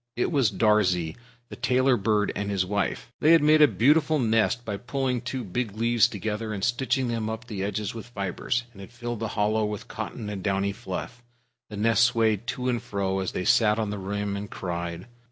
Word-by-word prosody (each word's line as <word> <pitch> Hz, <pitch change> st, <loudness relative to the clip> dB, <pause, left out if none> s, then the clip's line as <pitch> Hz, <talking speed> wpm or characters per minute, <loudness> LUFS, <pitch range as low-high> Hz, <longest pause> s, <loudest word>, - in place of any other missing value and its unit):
It 125 Hz, -, 0 dB
was 135 Hz, -7 st, +3 dB
Darzee, 90 Hz, -7 st, +2 dB, 0.3 s
the -, -, -8 dB
Tailorbird, 120 Hz, -5 st, +2 dB
and 100 Hz, 0 st, -2 dB
his 95 Hz, -2 st, 0 dB
wife. 100 Hz, +4 st, -2 dB
They 155 Hz, +2 st, +5 dB
had 165 Hz, -3 st, +5 dB
made 155 Hz, +1 st, +5 dB
a 150 Hz, -, +9 dB
beautiful 150 Hz, +5 st, +3 dB
nest 115 Hz, 0 st, +1 dB
by 105 Hz, -2 st, -3 dB
pulling 125 Hz, +1 st, -2 dB
two 125 Hz, +1 st, -4 dB
big 105 Hz, +2 st, -3 dB
leaves 115 Hz, 0 st, +4 dB
together 110 Hz, +2 st, -4 dB
and 100 Hz, -2 st, -5 dB
stitching 130 Hz, +1 st, +1 dB
them 115 Hz, -2 st, -2 dB
up 110 Hz, +2 st, -5 dB
the 105 Hz, -5 st, -5 dB
edges 100 Hz, 0 st, -2 dB
with 115 Hz, 0 st, -8 dB
fibers, 120 Hz, +2 st, -2 dB
and 100 Hz, -, -13 dB
had 95 Hz, -, -11 dB
filled 120 Hz, -1 st, -5 dB
the 110 Hz, -, -2 dB
hollow 110 Hz, +1 st, +2 dB
with 105 Hz, -1 st, -4 dB
cotton 105 Hz, -, -6 dB
and 105 Hz, -2 st, -5 dB
downy 100 Hz, +1 st, 0 dB
fluff. 100 Hz, +5 st, -6 dB, 0.5 s
The 105 Hz, -, -7 dB
nest 115 Hz, +2 st, +3 dB
swayed 115 Hz, -2 st, +2 dB
to 125 Hz, -1 st, -2 dB
and 120 Hz, -3 st, 0 dB
fro, 95 Hz, -1 st, -2 dB
as 95 Hz, -, -3 dB
they 90 Hz, -, -3 dB
sat 115 Hz, -3 st, +4 dB
on 110 Hz, -2 st, -1 dB
the 105 Hz, -, -4 dB
rim 100 Hz, +1 st, -3 dB
and 100 Hz, +1 st, -5 dB
cried. 85 Hz, -1 st, -4 dB
110 Hz, 205 wpm, -26 LUFS, 100-120 Hz, 0.5 s, a